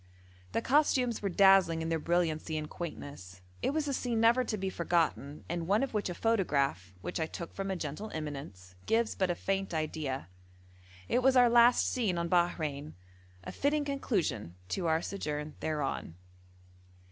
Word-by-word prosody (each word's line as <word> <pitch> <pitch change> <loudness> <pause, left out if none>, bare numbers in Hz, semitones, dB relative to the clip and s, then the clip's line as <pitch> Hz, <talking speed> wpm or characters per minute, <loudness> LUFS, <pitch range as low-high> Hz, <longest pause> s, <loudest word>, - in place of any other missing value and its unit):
The 230 - 0
costumes 255 -4 +2
were 200 - -1
dazzling 190 -3 +5
in 165 - -3
their 165 -1 0
brilliancy 160 -1 0
and 155 0 -3
quaintness. 140 - -8 0.2
It - - +1
was 295 +1 -1
a 280 - -1
scene 240 -3 -1
never 235 +3 +5
to 215 - -2
be 190 -1 -2
forgotten, 165 -4 -1
and 170 -1 -3
one 205 +6 +3
of 270 - -3
which 210 -3 -1
a 175 - -4
photograph, 140 - 0
which 180 - -4
I 160 - 0
took 170 +1 -7
from 195 0 -4
a 190 - -1
gentle 165 +6 -5
eminence, 140 - -7
gives 225 0 +2
but 190 -2 0
a 175 - +1
faint 195 -1 -2
idea. 155 -4 -3 0.8
It 250 - +2
was 265 +1 +4
our 245 -1 +7
last 240 +1 +6
scene 215 -8 0
on 170 0 -1
Bahrein 155 -5 0 0.5
a - - -6
fitting 290 +1 0
conclusion 175 - -2
to 180 -3 -1
our 160 +1 +2
sojourn 150 -5 -4
thereon. 150 - -3
175 Hz, 170 wpm, -31 LUFS, 155-225 Hz, 0.8 s, our